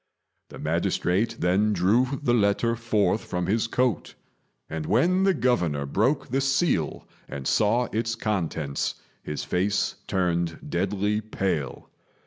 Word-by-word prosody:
The - - -10
magistrate 95 +6 0
then 100 +5 +2
drew 120 +9 +2
the 120 - +2
letter 115 +1 +2
forth 110 -2 +1
from 90 -1 -3
his 110 +5 +1
coat; 125 -6 -1 0.5
and 80 -1 -5
when 180 - +3
the 195 - +4
Governor 90 - +1
broke 110 - 0
the 135 +2 0
seal 135 - 0 0.2
and 70 -1 -6
saw 115 +4 +2
its 115 +1 -1
contents, 85 -10 -2 0.3
his 75 - -5
face 95 +3 0
turned 85 -3 0
deadly 100 +4 0
pale. 95 - -3
105 Hz, 125 wpm, -26 LUFS, 90-120 Hz, 0.5 s, the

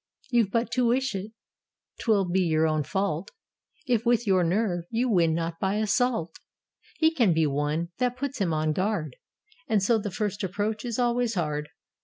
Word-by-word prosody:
"You've 235 -5 +3
but 230 +3 -1
to 250 -2 +2
wish 260 +1 +1
it: 195 +2 -5 0.7
't - - -7
will 200 -4 +3
be 185 +2 +1
your 160 -2 +2
own 155 -1 +1
fault. 195 +1 -2 0.6
If, 240 -5 +1
with 240 -1 +2
your 190 -3 +3
nerve, 175 -1 0
you 235 +3 0
win 165 -5 +3
not 165 0 -3
by 195 +1 0
assault: 215 -4 0 0.6
He 320 0 +3
can 235 - +3
be 160 -1 +3
won: 150 +4 -1
that 250 0 0
puts 275 -1 -4
him 180 -4 +1
on 155 0 0
his 155 - 0
guard, 185 - -1 0.5
And 215 -6 +2
so 225 +2 +3
the 205 - -4
first 205 +1 -3
approach 205 +5 -2
is 235 -2 -3
always 240 -2 +1
hard." 150 -3 -2
200 Hz, 190 wpm, -26 LUFS, 165-235 Hz, 0.7 s, You've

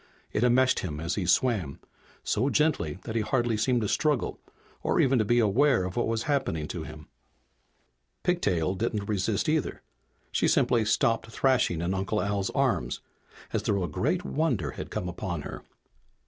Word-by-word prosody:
It 105 - +1
enmeshed 130 +2 +4
him 75 -5 -4
as 85 +3 -2
he 95 -4 -2
swam, 95 - +1 0.4
so 125 +6 +1
gently 140 - +1
that 110 - -5
he 115 - +2
hardly 120 0 +1
seemed 120 +3 +1
to 105 - 0
struggle 150 +1 0 0.4
or - - +1
even 130 -1 +4
to 110 - +2
be 120 +3 +2
aware 120 +1 +3
of 90 0 -4
what 120 - +1
was 115 0 -1
happening 135 - -1
to - - -4
him. - - -9 1.2
Pigtail 95 - +1
didn't 105 +1 -2
resist, 100 -3 0
either. - - -1 0.5
She - - +2
simply 115 -3 +3
stopped 115 +1 +1
thrashing 120 -7 +1
in 85 +2 -1
Uncle 95 +3 -1
Al's 100 -1 -1
arms, - - 0 0.5
as - - +1
though 100 -2 0
a - - -1
great 150 - -1
wonder 125 - 0
had - - -7
come 90 - -3
upon 90 -3 -4
her. - - -7
110 Hz, 170 wpm, -28 LUFS, 95-125 Hz, 1.2 s, enmeshed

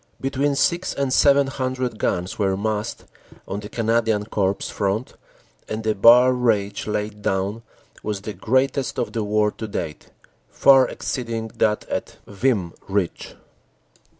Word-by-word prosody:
Between 140 +1 0
six 175 +5 +1
and 140 -2 0
seven 140 0 +5
hundred 130 -3 -3
guns 90 +3 -2
were 95 -2 +1
massed 110 +2 -3 0.4
on 100 - -3
the 105 0 -8
Canadian 115 -2 +1
Corps 100 -3 0 0.2
front, 100 +4 -2 0.6
and 110 +1 -3
the 110 0 +1
bar 120 +5 +7
rage 110 -6 0
laid 105 0 -3
down 100 +3 -1 0.4
was 105 -2 -3
the 105 +1 -6
greatest 130 +3 0
of 105 - -2
the 115 -2 -1
war 105 0 +1
to 110 - -7
date, 85 -7 -5 0.4
far 135 - +5
exceed 125 -3 -4
ing 110 -1 -3
that 105 -1 0
at - - -4
Vimy 100 -4 0 0.2
Ridge. 95 -3 -2
110 Hz, 145 wpm, -22 LUFS, 105-130 Hz, 0.6 s, bar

